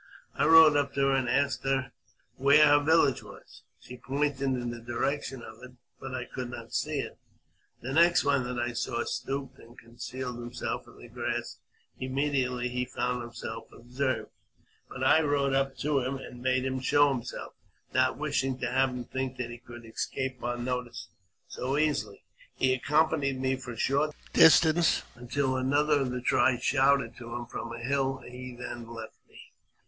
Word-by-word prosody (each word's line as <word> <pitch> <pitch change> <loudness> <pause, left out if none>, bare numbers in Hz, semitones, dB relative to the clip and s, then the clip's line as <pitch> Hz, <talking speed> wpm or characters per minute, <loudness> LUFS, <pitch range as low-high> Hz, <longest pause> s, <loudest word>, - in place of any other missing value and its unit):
I - - +1
rode 160 -2 +8
up 140 -1 0
to 140 - +1
her 135 0 +3
and 130 -2 0
asked 140 +2 +1 0.7
where 140 +3 +6
her 145 0 +6
village 145 -4 +3
was. - - -14 0.2
She 125 - -11
pointed 140 +2 -1
in 125 -3 -1
the 120 - -7
direction 130 +2 -2
of 110 +1 -11
it, 125 0 -11 0.3
but 135 -1 -6
I 125 -1 -4
could 125 -1 -6
not 125 - -9
see - - 0
it. - - -9 0.6
The 130 +3 -4
next 170 +3 +5
one 140 -2 +2
that 125 0 -4
I 120 0 -1
saw 120 0 -2
stooped 135 -1 -4
and 120 +2 -16
concealed 125 +1 -7
himself 120 0 -5
in - - -16
the - - -12
grass - - -4 0.4
imme 135 +3 -1
diately 125 -2 0
he 125 0 -1
found 125 0 -2
himself 115 -1 -7
observed; 130 +3 -3 0.6
but - - -5
I 160 - +5
rode 140 -2 +1
up 135 0 0
to 150 -2 +2
him, 130 +1 -2
and 125 -2 -10
made 130 0 +1
him 130 0 -1
show 145 +2 +4
himself, 125 -2 -6 0.4
not - - +2
wishing 135 -1 -1
to - - -3
have 135 0 +3
him 125 -1 -5
think 130 +1 -4
that 120 -1 -4
he 120 - -9
could 120 -1 -12
escape 130 +3 -4
our 120 0 -2
notice 120 -1 -4 0.4
so 135 +3 -2
easily. 145 -10 -1 0.3
He 130 0 +2
accompanied 145 0 +1
me 130 0 +1
for 125 -2 -8
a - - -11
short 145 +5 +1 0.2
distance, 160 +1 +6
until 130 +2 -1
another 145 +3 +2
of 135 -2 -1
the 125 0 -3
tribe 125 0 +2
shouted 140 -3 +2
to 120 -1 -8
him 120 0 -4
from 115 0 -6
a 120 - -6
hill, 135 +2 0
and 125 -1 -13
he 125 0 -8
then 120 -1 -7
left 115 -1 -9
me. - - -16
130 Hz, 185 wpm, -29 LUFS, 120-140 Hz, 0.7 s, rode